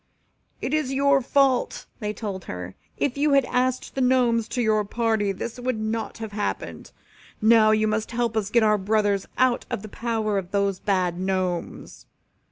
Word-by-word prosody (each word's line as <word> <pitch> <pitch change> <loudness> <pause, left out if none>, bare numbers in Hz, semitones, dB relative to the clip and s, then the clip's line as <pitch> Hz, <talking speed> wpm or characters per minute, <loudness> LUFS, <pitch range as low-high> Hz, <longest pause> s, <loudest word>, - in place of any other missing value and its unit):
"It 260 - -2
is 305 -4 +1
all 270 - -3
your 275 0 +4
fault," 270 0 +1
they 210 -1 -2
told 200 -3 -6
her. 90 0 -6 0.2
"If 280 0 -1
you 295 0 +3
had 275 -2 +4
asked 255 +1 -1
the 270 - -2
Gnomes 245 -3 +3
to 250 - -4
your 215 -2 +2
party 220 -1 0
this 230 +5 -6
would 250 -2 -2
not 220 0 -3
have 220 -2 -6
happened. 205 0 -4 0.5
Now 220 0 +5
you 215 0 +3
must 215 0 -1
help 235 -1 -1
us 215 -3 0
to - - -11
get 235 -2 +5
our 210 -1 +3
brothers 205 0 +1
out 255 -1 +2
of 195 - -4
the 215 - -8
power 220 -2 -1
of 180 -2 -8
those 200 -1 0
bad 180 -3 0
Gnomes. 185 -2 -3
220 Hz, 185 wpm, -24 LUFS, 200-245 Hz, 0.5 s, Now